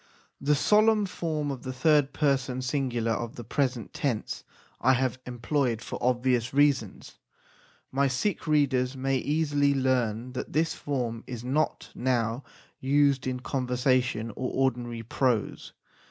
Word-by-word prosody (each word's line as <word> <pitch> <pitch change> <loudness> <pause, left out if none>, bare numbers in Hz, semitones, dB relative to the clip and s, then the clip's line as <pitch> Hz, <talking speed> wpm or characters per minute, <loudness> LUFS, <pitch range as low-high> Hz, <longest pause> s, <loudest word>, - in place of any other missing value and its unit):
The 145 +1 +3
solemn 210 +6 +4
form 155 -6 -2
of 130 -2 -6
the 130 - -5
third 145 +2 +3
person 135 -3 0
singular 125 -4 -1
of 115 +1 -3
the 120 - -7
present 125 -1 -1
tense 125 -7 -2 0.4
I 130 - +5
have 130 0 0
employed 125 -1 0
for - - -6
obvious 125 0 +1
reasons. 140 -8 +1 0.7
My 140 +1 +2
Sikh 155 +9 -1
readers 135 -4 +2
may 135 +1 0
easily 145 0 +1
learn 125 -3 0
that 130 - -5
this 160 +2 +1
form 120 -5 -3
is 120 -2 -6
not 145 +5 -1
now 120 0 0 0.4
used 140 -1 +2
in 125 -1 -2
conversation 125 -3 0
or 125 +4 -3
ordinary 120 -3 -1
prose. 120 -2 -1
130 Hz, 135 wpm, -27 LUFS, 125-145 Hz, 0.7 s, I